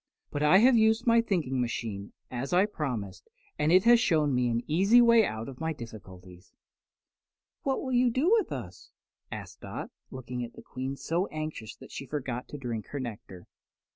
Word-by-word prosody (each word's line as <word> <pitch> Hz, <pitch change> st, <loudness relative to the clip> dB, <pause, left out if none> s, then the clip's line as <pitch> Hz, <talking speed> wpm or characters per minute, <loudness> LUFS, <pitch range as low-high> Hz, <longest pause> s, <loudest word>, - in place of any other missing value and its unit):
"But 145 Hz, -, -3 dB
I 150 Hz, +5 st, +6 dB
have 245 Hz, +5 st, +6 dB
used 220 Hz, +1 st, +3 dB
my 230 Hz, -1 st, +5 dB
thinking 155 Hz, -, -1 dB
machine, 110 Hz, -4 st, -4 dB, 0.2 s
as 130 Hz, +4 st, -4 dB
I 185 Hz, +3 st, +5 dB
promised, 135 Hz, -, -5 dB, 0.3 s
and 150 Hz, -, +2 dB
it 185 Hz, +1 st, +6 dB
has 235 Hz, 0 st, +7 dB
shown 155 Hz, -, +2 dB
me 125 Hz, -1 st, +2 dB
an 115 Hz, 0 st, -1 dB
easy 195 Hz, +10 st, +4 dB
way 235 Hz, -1 st, +6 dB
out 110 Hz, -, -3 dB
of 135 Hz, -2 st, -9 dB
my 160 Hz, 0 st, -1 dB
difficulties." 95 Hz, -, -12 dB, 1.1 s
"What 270 Hz, -1 st, -1 dB
will 260 Hz, -, -3 dB
you 250 Hz, 0 st, +4 dB
do 265 Hz, -, +1 dB
with 450 Hz, -2 st, +3 dB
us?" -, -, -7 dB, 0.4 s
asked -, -, -8 dB
Dot, -, -, -6 dB, 0.2 s
looking 125 Hz, -1 st, -5 dB
at 120 Hz, -, -8 dB
the -, -, -13 dB
Queen 130 Hz, +2 st, -5 dB
so 170 Hz, +7 st, -1 dB
anxiously 155 Hz, -8 st, -6 dB
that -, -, -16 dB
she 135 Hz, -, -7 dB
forgot 130 Hz, -4 st, -4 dB
to 145 Hz, -, -8 dB
drink 120 Hz, -5 st, -5 dB
her 145 Hz, -, -5 dB
nectar. 105 Hz, -7 st, -8 dB
145 Hz, 185 wpm, -29 LUFS, -, 1.1 s, has